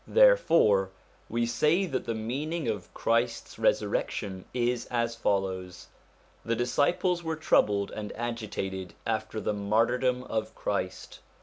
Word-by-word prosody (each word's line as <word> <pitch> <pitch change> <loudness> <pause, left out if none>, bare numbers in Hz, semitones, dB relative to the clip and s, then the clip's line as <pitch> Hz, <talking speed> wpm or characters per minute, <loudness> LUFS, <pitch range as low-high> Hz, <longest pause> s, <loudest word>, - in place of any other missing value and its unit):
Therefore 170 - +5 0.4
we 115 +1 0
say 155 +10 +2
that 135 -8 -3
the 115 - -2
meaning 140 +8 -3
of 100 -6 -3
Christ's 115 +1 0
resur - - +2
rection 95 -2 -3
is 120 0 0
as 115 -1 -1
follows: 95 -4 -2 0.5
the 115 - 0
disciples 145 +9 +1
were 160 -1 -2
troubled 105 -10 +2
and 105 -1 -5
agitated 105 -6 -4
after 110 -1 -2
the 105 - -1
martyrdom 120 +5 +1
of 110 -2 -3
Christ. 100 -2 -3
115 Hz, 125 wpm, -28 LUFS, 105-125 Hz, 0.5 s, Therefore